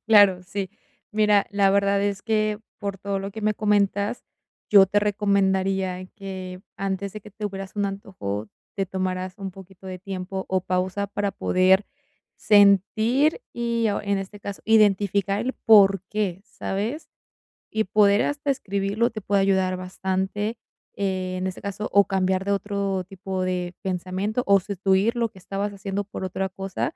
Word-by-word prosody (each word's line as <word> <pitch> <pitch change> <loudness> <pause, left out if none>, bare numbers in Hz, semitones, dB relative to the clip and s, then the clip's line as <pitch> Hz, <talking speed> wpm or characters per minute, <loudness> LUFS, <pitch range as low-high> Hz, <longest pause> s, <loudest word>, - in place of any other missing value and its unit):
Claro, 200 -4 +6
sí. 195 0 -4 0.4
Mira, 210 -1 +3
la 200 -1 +3
verdad 200 0 +2
es 200 -1 -1
que, 215 -2 0 0.2
por 200 -2 -4
todo 200 0 -2
lo 195 +1 -5
que 220 +2 -8
me 215 0 +1
comentas, 205 +1 +1 0.5
yo 195 -2 +8
te 205 +2 +2
recomendaría 195 -2 +1
que, 185 -2 -7 0.2
antes 195 0 -3
de 215 - -7
que 210 - -13
tuvieras 195 -1 -6
un 205 -1 +1
antojo, 110 - -5 0.3
te 195 -1 0
tomaras 185 0 -3
un 195 -1 -5
poquito 190 0 -14
de 185 -1 -6
tiempo 190 0 -5
o 190 0 +1
pausa 185 +2 -1
para 200 0 -2
poder 190 +2 +3 0.5
sentir 220 - +4
y, 235 -1 0
o, 200 - -2
en 200 -1 0
este 200 +1 -7
caso, 200 -1 -6
identificar 200 -2 +3
el 255 +3 -1
por 195 -3 +6
qué, 195 -3 -2
¿sabes? 225 +9 -4 0.6
Y 220 0 +1
poder 205 +1 +4
hasta 290 0 -2
escribirlo 200 -2 0
te 215 -2 -6
puede 200 0 +2
ayudar 190 -1 +2
bastante, 190 +4 -2 0.4
eh, 185 -2 -2
en 185 - -2
este 185 - -6
caso, 200 +1 -4
o 200 -1 +6
cambiar 190 0 0
de 200 - 0
otro 200 -1 -1
tipo 190 0 -4
de 180 -1 -2
pensamiento 190 +5 -2
o 200 -1 +6
sustituir 195 +4 +1
lo 230 -1 0
que 190 - -20
estabas 200 +2 -3
haciendo 195 0 -3
por 195 -1 -7
otra 190 +1 -2
cosa, 195 - -4
195 Hz, 160 wpm, -24 LUFS, 190-205 Hz, 0.6 s, yo